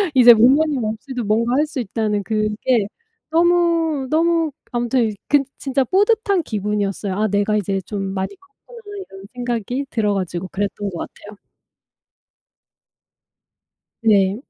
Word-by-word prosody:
이제 245 -2 +9
부모님 265 +4 +3
없이도 230 +4 -4
뭔가 230 +3 +1
할 295 +3 +3
수 300 -3 -5
있다는 210 -2 -1
그게 215 +1 0 0.4
너무 335 -3 +2
너무 330 0 +2 0.2
아무튼 240 -1 +1 0.2
그 290 - +5 0.2
진짜 270 -1 0
뿌듯한 400 - +2
기분이었어요. 205 -3 -2
'아 215 +2 +1
내가 205 +1 +1
이제 195 -1 -1
좀 205 +1 -4
많이 190 - -3
컸구나.' 420 +5 -17 0.3
이런 195 0 -11
생각이 245 +2 -3
들어 210 -5 0
가지고 185 -2 -3
그랬던 205 +1 -3
것 170 - -6
같아요. 205 +4 -9 2.7
네. 200 -3 +3
230 Hz, 270 characters per minute, -20 LUFS, 205-295 Hz, 2.7 s, 이제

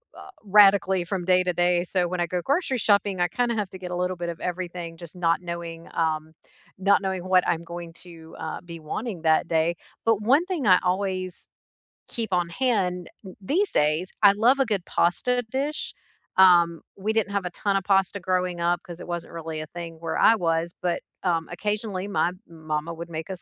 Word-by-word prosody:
uh, - - -11 0.2
radically 195 -2 +5
from 180 0 -3
day 185 0 +4
to 180 0 0
day, 175 0 +2
so 180 0 0
when 180 +1 -3
I 175 - +2
go 180 +1 -2
grocery 280 -2 0
shopping, 200 -4 +2
I 175 - +3
kinda 235 +5 0
have 210 -3 -2
to 190 - -8
get 180 -1 -6
a - - -2
little 180 +1 -1
bit 175 -1 -4
of 170 - -6
everything 175 -2 -4
just 170 0 -9
not 170 -1 +1
knowing 170 -1 -6
um, 160 -1 -1 0.4
not 200 +1 +3
knowing 190 -2 -3
what 185 -1 +4
I'm 170 -1 0
going 170 0 -8
to, 165 -3 -13
uh, 160 - -5
be 170 -1 -9
wanting 175 +3 -5
that 160 +1 +3
day. 165 +1 +1 0.3
But 225 -2 +3
one 270 +10 +4
thing 350 - -2
I 185 -2 +8
always 185 -1 -2 0.6
keep 230 -4 -4
on 175 -1 +2
hand 185 -5 0 0.2
th 185 - -10
these 355 - +1
days, 155 +5 +1
I 200 - +9
love 235 +7 +3
a 270 - +4
good 205 -6 -2
pasta 245 +8 +1
dish. 285 +3 -2 0.4
Um, 170 -3 +6 0.2
we 210 +3 -1
didn't 215 -3 0
have 200 -2 -1
a - - -1
ton 200 +3 -1
of 195 - +1
pasta 195 0 +2
growing 180 -1 -1
up 175 +1 +1
'cause 175 -1 -10
it - - -9
wasn't 175 -1 -5
really 160 -1 -5
a 155 - -6
thing 165 0 -8
where 165 -1 -3
I - - +6
was, 170 -3 0
but, 175 -1 -1 0.2
um, 165 -3 0
occasionally 205 +1 -3
my 190 -3 +1 0.2
mama 160 0 -4
would 170 +1 -8
make 160 +1 -5
us 185 -2 -4
180 Hz, 210 wpm, -25 LUFS, 170-200 Hz, 0.6 s, I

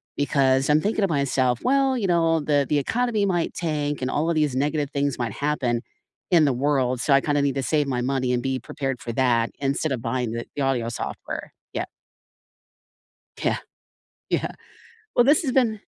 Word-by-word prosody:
because 135 -1 +2
I'm 150 +1 +5
thinking 210 +1 0
to 195 - +3
myself, 135 -5 +1
"Well, 270 0 +2
you 205 -5 -1
know, 165 -2 +3
the 145 -1 +1
the 150 - +2
economy 225 - 0
might 175 -4 0
tank 150 -4 -2
and 130 - -1
all 160 +3 0
of 170 - +1
these 150 -4 +1
negative 145 +1 0
things 140 -2 -1
might 115 -4 -2
happen 130 -5 -1 0.5
in 165 -3 +6
the 135 - +2
world, 130 -2 +1
so 140 - +2
I 135 - +7
kinda 145 -1 +1
need 140 -1 0
to 135 - -1
save 150 -1 +1
my 125 -2 -1
money 130 -1 0
and 120 - 0
be 130 -1 -1
prepared 135 -4 -4
for 115 - -4
that 120 -2 +2
instead 140 +2 -1
of 125 -4 -2
buying 120 -1 -2
the 115 0 -4
the 145 - -2
audio 125 -4 0
software" 120 - -5 0.2
Yeah. - - -2 1.6
Yeah. - - +2 0.7
Yeah. - - 0 0.6
Well, 245 - +5
this 290 +4 +4
has 265 -5 -1
been 225 -5 +2
140 Hz, 190 wpm, -24 LUFS, 130-160 Hz, 1.6 s, I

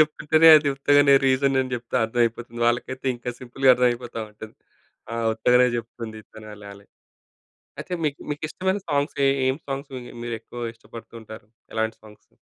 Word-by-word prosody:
చెప్తుంటేనే 155 +1 +4
అది 150 -1 +1
ఉత్తగానే 145 0 +4
రీజనని 130 -1 +1
జెప్తే 120 +1 -4
అర్థమైపోతుంది. 120 0 -2
వాళ్ళకైతే 130 +2 -2
ఇంకా 125 +1 -5
సింపుల్‌గా 130 +1 +2
అర్థమైపోతావుంటది. 115 -3 -3 0.6
ఆ! - - -3 0.2
ఉత్తగానే 125 +3 +4
చెప్తుంది 115 -1 -7
తనలాలే. 105 -2 -12 0.9
అయితే, 185 - -9
మీకు 145 -2 -2
మీకిష్టమైన 185 +6 -2
సాంగ్స్ 145 +1 -1
ఏ - - +4 0.2
ఏం 130 - 0
సాంగ్స్ 135 +1 -5
మిగు 125 -1 -9
మీరెక్కువా 120 +1 -7
ఇష్టపడుతుంటారు? 115 -2 -12 0.3
ఎలాంటి 110 0 -1
సాంగ్స్? 105 -1 -18
120 Hz, 125 wpm, -23 LUFS, 110-140 Hz, 0.9 s, చెప్తుంటేనే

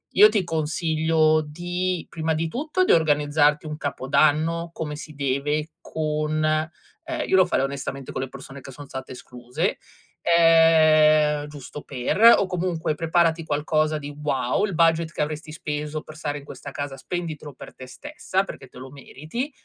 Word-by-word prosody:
io 210 +3 +9
ti 210 -3 0
consiglio 160 -1 +1
di 175 +3 -3
prima 160 -1 -2
di 160 +1 -2
tutto 305 - -1
di - - +3
organizzarti 150 -1 +3
un 150 - -5
capodanno 155 +4 +1
come 150 -2 -5
si 155 0 -9
deve, 145 +3 -1
con 155 0 -2
ehm, 160 - -3
io - - +2
lo 185 - +6
farei - - 0
onestamente 135 -1 -6
con 130 - -4
le 135 - -3
persone 135 +1 -10
che 135 - -10
son 145 +3 -10
state 130 -1 -7
escluse, 125 -1 -4 0.5
ehm, 155 -3 +5
giusto 145 0 -9
per, 130 +7 -3 0.2
o 200 - +1
comunque 175 -3 -2
preparati 165 0 +1
qualcosa 155 +1 0
di 145 -1 -8
wow, 135 +5 0
il 195 - -4
budget 165 0 +2
che - - -3
avresti 155 +1 -4
speso 150 -1 -4
per 155 - -12
stare 145 -1 -3
in - - -14
questa 140 - -9
casa 145 -1 -5
spenditelo 155 0 -6
per - - -12
te 130 - -10
stessa, 295 - -3
perché 135 -8 -10
te 125 - -17
lo 130 +1 -10
meriti. 155 - -6
155 Hz, 165 wpm, -24 LUFS, 145-165 Hz, 0.5 s, io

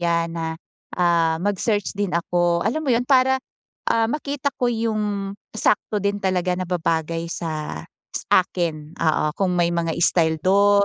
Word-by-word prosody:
yan 170 -1 0
na, 165 -1 -2 0.5
ah, 170 -2 +2
mag 205 +1 0
search 205 -1 -1
din 200 -3 -1
ako, 170 0 +1
alam 300 - -1
mo 265 - +2
yun? 235 - +3
Para, 265 -1 +4 0.5
ah, 230 0 +3
makita 285 -1 -2
ko 245 - +3
yung 210 -3 -1 0.2
sakto 210 0 +1
din 200 0 -1
talaga 185 -2 +1
na 185 -1 -3
babagay 165 -1 -1
sa 155 -3 -4 0.3
sa - - -5 0.2
akin 160 -4 -3
oo 155 -2 +1
kung 180 -2 +2
may 170 0 +2
mga 165 -1 -1
style 160 -3 +3
dun, 200 +2 +4
180 Hz, 160 wpm, -22 LUFS, 170-210 Hz, 0.5 s, Para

